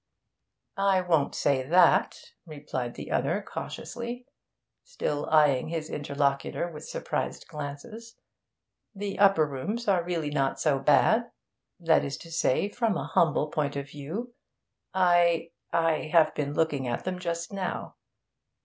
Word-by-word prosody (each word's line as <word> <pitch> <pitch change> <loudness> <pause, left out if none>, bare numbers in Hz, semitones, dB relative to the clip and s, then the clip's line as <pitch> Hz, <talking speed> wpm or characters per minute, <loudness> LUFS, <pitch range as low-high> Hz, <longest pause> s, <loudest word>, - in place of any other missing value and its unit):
'I 195 -1 +3
won't 165 -5 +1
say 140 -2 +2
that,' 170 +8 +4 0.3
replied 145 -5 -5
the - - -8
other - - +1
cautiously, 240 +1 -6 0.6
still 150 - -3
eyeing 150 -4 +4
his 160 -1 -4
interlocutor 140 +2 -1
with 155 -2 -9
surprised - - -3
glances. 165 +10 -8 0.8
'The 200 0 -4
upper 195 -6 +5
rooms 200 - -4
are 185 -4 +3
really 165 -4 -2
not 135 -2 0
so 145 -4 +2
bad 150 - +4 0.5
that 165 -2 +3
is 140 0 -4
to 165 - -12
say, 165 +2 +1
from 215 -2 0
a - - -5
humble 155 -2 +2
point 145 -2 -1
of 140 0 -4
view. 175 - -6 0.6
I 175 -2 +3 0.2
I 165 -2 +1
have 160 -3 +5
been 145 0 -3
looking 145 -5 0
at 120 - -2
them 185 -1 -3
just 170 +1 -4
now. 190 -2 -4
160 Hz, 135 wpm, -28 LUFS, 145-185 Hz, 0.8 s, upper